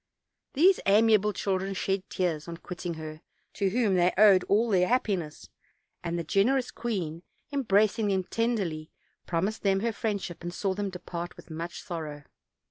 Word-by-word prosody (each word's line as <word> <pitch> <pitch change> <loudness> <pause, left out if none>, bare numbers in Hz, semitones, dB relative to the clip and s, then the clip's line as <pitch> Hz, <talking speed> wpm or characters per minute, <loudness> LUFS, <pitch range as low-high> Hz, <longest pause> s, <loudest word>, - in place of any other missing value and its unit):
These 360 +7 +5
amiable 210 0 +5
chil 195 -1 -1
dren 195 +1 -4
shed 195 +1 0
tears 170 -4 -1
on 170 -1 -6
quitting 175 -1 -6
her 155 0 -8 0.3
to 200 -1 0
whom 220 -1 +1
they 180 0 +4
owed 200 -3 +7
all 220 +3 +2
their 180 -2 +4
happiness, 195 - -1 0.5
and 170 0 -2
the 170 - -2
generous 240 - +2
queen, 180 -9 -3 0.3
embracing 215 -5 +2
them 190 -2 +1
tenderly, 190 -9 -1 0.4
promised 190 +6 -1
them 195 -1 +2
her 230 0 0
friendship, 200 -5 -3
and 175 0 -4
saw 190 +2 -1
them 200 +1 -2
depart 175 -1 -6
with - - -13
much 165 +2 -6
sorrow. 155 -4 -6
190 Hz, 160 wpm, -28 LUFS, 170-215 Hz, 0.5 s, owed